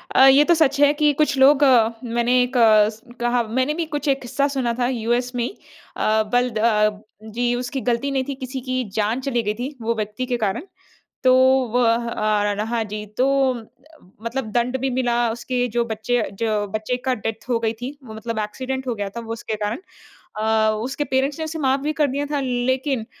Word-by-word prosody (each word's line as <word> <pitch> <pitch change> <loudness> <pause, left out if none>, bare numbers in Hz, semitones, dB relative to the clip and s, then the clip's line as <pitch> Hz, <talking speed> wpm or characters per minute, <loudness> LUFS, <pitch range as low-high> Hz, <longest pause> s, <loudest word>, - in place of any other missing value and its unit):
अ, 265 - +8
ये 275 +2 +7
तो 345 - +5
सच 300 -3 +2
है 290 0 +6
कि 300 0 +3
कुछ 290 -1 +1
लोग 285 +2 +6
अ, 240 -5 +5
मैंने 240 +1 +2
एक 250 +1 -2
अ, 215 -2 +6
स 220 0 -12 0.2
कहा 240 0 +2
मैंने 260 +6 0
भी 335 0 -2
कुछ 290 - -3
एक 275 -1 +1
किस्सा 275 +3 0
सुना 240 -3 0
था 245 - +2
यूएस 245 0 -1
में 240 - 0
ही - - -2 0.5
अ, 220 0 +2
बल 245 0 +3
द 220 - -5
अ, 215 -2 +2 0.3
जी 240 +2 0
उसकी 250 +2 -3
गलती 240 +4 -1
नहीं 265 -1 0
थी 275 - -3
किसी 260 0 -6
की 255 0 0
जान 220 +4 0
चली 245 -4 -1
गई 210 - -1
थी 270 +4 -4
वो 230 +1 -1
व्यक्ति 215 +3 -3
के 245 -1 -1
कारण। 210 - -2 0.6
तो 255 - +6 0.4
व 250 - +4
आ 215 -3 +1
र 210 - -2
हाँ 235 -1 0
जी 210 0 -6
तो 260 - +4 1.0
मतलब 250 +3 -2
दंड 245 +2 +1
भी 270 - 0
मिला 245 -1 0 0.2
उसके 245 +1 -2
जो 235 0 +2
बच्चे 230 +2 -1 0.2
जो 215 -2 0
बच्चे 215 +4 -2
का 260 - +1
डेथ 225 0 -5
हो 235 - +2
गई 225 -1 0
थी 255 - -3
वो 220 - -10
मतलब 225 0 -5
एक्सीडेंट 260 +5 -4
हो 240 - 0
गया 205 -1 -3
था 235 - -6
वो 225 0 -6
उसके 225 -1 -4
कारण। 210 +2 -2 0.6
अ, 220 0 +2
उसके 275 +3 -2
पेरेंट्स 270 +2 0
ने 320 - -2
उसे 320 +1 -5
माफ़ 270 0 +2
भी 305 - 0
कर 295 - +4
दिया 285 +2 -2
था। 285 - 0
लेकिन 255 -1 -1
245 Hz, 215 wpm, -22 LUFS, 220-265 Hz, 1.0 s, अ